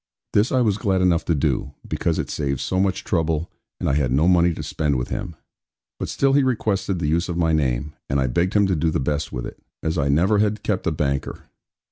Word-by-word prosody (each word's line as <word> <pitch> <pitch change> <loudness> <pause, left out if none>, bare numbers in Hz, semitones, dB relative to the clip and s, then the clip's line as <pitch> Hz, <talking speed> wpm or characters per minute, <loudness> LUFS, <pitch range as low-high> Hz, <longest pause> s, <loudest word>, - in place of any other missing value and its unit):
This 105 +3 +3
I 130 - +3
was 105 -3 +1
glad 95 -2 +1
enough 85 -2 +2
to 85 - +1
do; 70 -1 -1
because - - -1
it - - -3
saved 70 -3 -2
so 95 - -1
much 95 -1 0
trouble, 80 -1 -1 0.3
and - - -2
I - - +2
had 70 -3 +1
no 75 +6 +3
money 90 -1 +4
to 80 - -5
spend 75 -3 -1
with 60 - -3
him. 95 -6 -4 0.6
But - - -3
still 135 0 +2
he 140 - +5
requested 105 -7 0
the 85 - -2
use 85 +5 +1
of 85 - -2
my 80 -2 +2
name; 70 -1 0 0.2
and 70 - +1
I 65 - +2
begged 85 - 0
him 100 -1 +5
to 95 -2 +1
do 80 +1 +1
the 80 - 0
best 75 +3 -2
with - - -4
it, - - -10 0.2
as 80 0 -1
I 70 0 +1
never 95 +9 +3
had 105 0 0
kept 100 -5 -1
a - - +2
banker. 70 -3 -2
85 Hz, 240 wpm, -22 LUFS, 70-95 Hz, 0.6 s, he